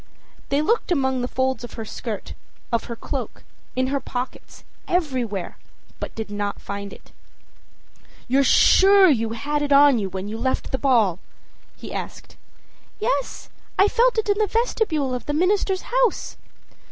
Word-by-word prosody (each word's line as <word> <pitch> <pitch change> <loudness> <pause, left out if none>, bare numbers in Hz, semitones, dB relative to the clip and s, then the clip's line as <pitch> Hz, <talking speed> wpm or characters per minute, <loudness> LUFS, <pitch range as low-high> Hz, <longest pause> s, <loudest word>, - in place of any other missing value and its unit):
â - - -30 0.5
They 280 +1 +2
looked 450 +1 0
among 265 -5 +1
the 245 - -1
folds 260 0 -1
of 240 - -8
her 225 - -6
skirt, 220 -1 -6 0.4
of 230 -1 0
her 235 - -6
cloak, - - -6 0.3
in 255 0 +1
her 280 - +1
pockets, 250 -1 -6 0.2
everywhere, 255 - -2 0.4
but - - -6
did 220 -2 -5
not 205 0 -3
find 200 0 -6
it. - - -15 1.2
âYou're 270 +3 +3
sure 390 +7 +6
you 225 -4 0
had 295 +6 -2
it 290 0 -2
on 280 -3 +6
when 190 +1 -5
you 220 +2 -5
left 260 +2 -1
the 265 - -1
ball?â 225 -10 +3 0.6
he - - -9
asked. - - -7 0.6
âYes, - - -2 0.3
I 390 - +6
felt 475 +3 +2
it 440 - 0
in 405 0 +1
the 430 - +2
vestibule 400 - 0
of 250 - -5
the 290 - -1
minister's 380 +3 +1
house. - - 0
265 Hz, 160 wpm, -23 LUFS, 230-375 Hz, 1.2 s, sure